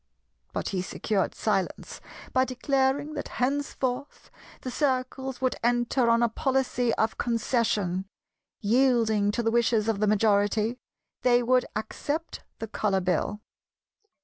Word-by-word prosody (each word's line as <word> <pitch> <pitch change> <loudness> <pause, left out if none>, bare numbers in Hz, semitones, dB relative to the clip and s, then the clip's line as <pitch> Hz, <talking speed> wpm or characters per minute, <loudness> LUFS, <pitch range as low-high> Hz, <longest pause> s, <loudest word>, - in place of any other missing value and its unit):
But - - -3
he 190 -2 -1
secured 195 +1 -1
silence 195 -4 -2 0.3
by 260 - +4
declaring 270 +3 0
that 295 - -4
henceforth 270 0 -2 0.3
the 255 - -5
Circles 265 -1 -1
would 255 -1 0
enter 240 +1 +2
on 230 +1 +4
a - - +5
policy 250 0 0
of 220 0 0
Concession; 220 -6 0 0.6
yielding 225 -2 +3
to 235 +3 -1
the 225 - +1
wishes 230 -2 +2
of 220 -3 0
the 210 - +2
majority, 215 +2 +2 0.4
they 245 -1 +4
would 255 +1 +3
accept 290 +9 -4
the - - -4
Colour 205 -2 0
Bill. 190 +3 -1
235 Hz, 125 wpm, -27 LUFS, 215-260 Hz, 0.6 s, a